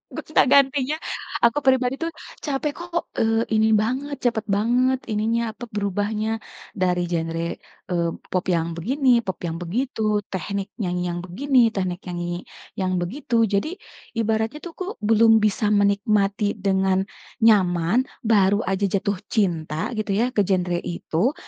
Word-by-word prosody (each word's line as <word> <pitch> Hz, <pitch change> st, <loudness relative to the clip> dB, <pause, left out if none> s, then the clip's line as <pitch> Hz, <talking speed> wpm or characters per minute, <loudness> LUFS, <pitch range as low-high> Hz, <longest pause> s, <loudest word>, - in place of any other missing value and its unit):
gonta-gantinya, 280 Hz, -1 st, +3 dB, 0.5 s
aku 235 Hz, +5 st, +4 dB
pribadi 260 Hz, 0 st, +3 dB
tuh 330 Hz, 0 st, -2 dB, 0.3 s
capek 290 Hz, 0 st, -1 dB
kok, 345 Hz, 0 st, -3 dB, 0.2 s
eee, 225 Hz, 0 st, +2 dB
ini 220 Hz, 0 st, +4 dB
banget 260 Hz, +7 st, -1 dB
cepet 230 Hz, -3 st, +1 dB
banget 245 Hz, +6 st, +2 dB
ininya, 220 Hz, +2 st, +1 dB
apa, 230 Hz, +3 st, -9 dB
berubahnya, 205 Hz, +1 st, -1 dB, 0.5 s
dari 180 Hz, -1 st, +1 dB
genre, 165 Hz, 0 st, -1 dB, 0.4 s
eee, 170 Hz, -2 st, +1 dB, 0.2 s
pop 185 Hz, -1 st, 0 dB
yang 165 Hz, -3 st, +1 dB
begini, 260 Hz, -, 0 dB, 0.2 s
pop 190 Hz, -, -2 dB
yang 165 Hz, -1 st, -3 dB
begitu, 215 Hz, +2 st, -1 dB
teknik 195 Hz, +1 st, -3 dB
nyanyi 180 Hz, -1 st, -1 dB
yang 175 Hz, -, -4 dB
begini, 260 Hz, +9 st, +1 dB, 0.2 s
teknik 185 Hz, -2 st, -2 dB
nyanyi 175 Hz, 0 st, -4 dB, 0.3 s
yang 185 Hz, -1 st, 0 dB
begitu 230 Hz, +4 st, 0 dB
jadi 205 Hz, -, 0 dB, 0.4 s
ibaratnya 225 Hz, +4 st, 0 dB
tuh 345 Hz, -, -6 dB
aku 370 Hz, -, -4 dB, 0.2 s
belum 225 Hz, 0 st, +5 dB
bisa 210 Hz, +1 st, +1 dB
menikmati 205 Hz, 0 st, +2 dB
dengan 190 Hz, -1 st, +1 dB, 0.4 s
nyaman, 195 Hz, +2 st, +4 dB, 0.2 s
baru 205 Hz, -2 st, +3 dB
aja 195 Hz, +1 st, +1 dB
jatuh 200 Hz, 0 st, 0 dB, 0.2 s
cinta 165 Hz, -, 0 dB
gitu 215 Hz, -2 st, -1 dB
ya 240 Hz, +4 st, +2 dB
ke -, -, +2 dB
genre 180 Hz, -2 st, +1 dB
itu, 175 Hz, -, -1 dB
210 Hz, 135 wpm, -23 LUFS, 185-240 Hz, 0.5 s, belum